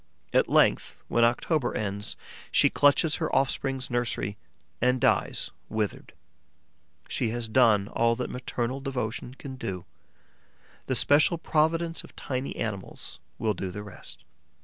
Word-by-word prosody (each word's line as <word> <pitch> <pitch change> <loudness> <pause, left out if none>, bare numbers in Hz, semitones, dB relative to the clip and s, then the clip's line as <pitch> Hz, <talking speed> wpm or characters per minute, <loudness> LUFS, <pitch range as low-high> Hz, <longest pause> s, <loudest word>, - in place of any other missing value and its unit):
At - - +4
length, - - +3
when 120 - +3
October 120 +3 +1
ends, 100 0 -2 0.4
she - - +5
clutches 145 +2 +4
her 160 - -1
offspring's 135 -1 0
nursery 120 -4 -1 0.5
and 125 +1 +3
dies - - +1 0.2
withered. 110 -2 -3 0.9
She 115 - 0
has 120 0 -2
done 110 -4 +4
all 115 +1 +2
that 125 - -4
maternal 125 0 -3
devotion 125 -2 -3
can 135 -1 -8
do; 95 -7 -5 1.0
the 130 - +1
special 145 +7 +5
providence 165 +1 +1
of - - -15
tiny 130 -1 -3
animals 105 -5 -5 0.2
will 110 -1 +1
do 95 0 -4
the 105 +3 -6
rest. 100 -3 -9
120 Hz, 130 wpm, -27 LUFS, 110-135 Hz, 1.0 s, she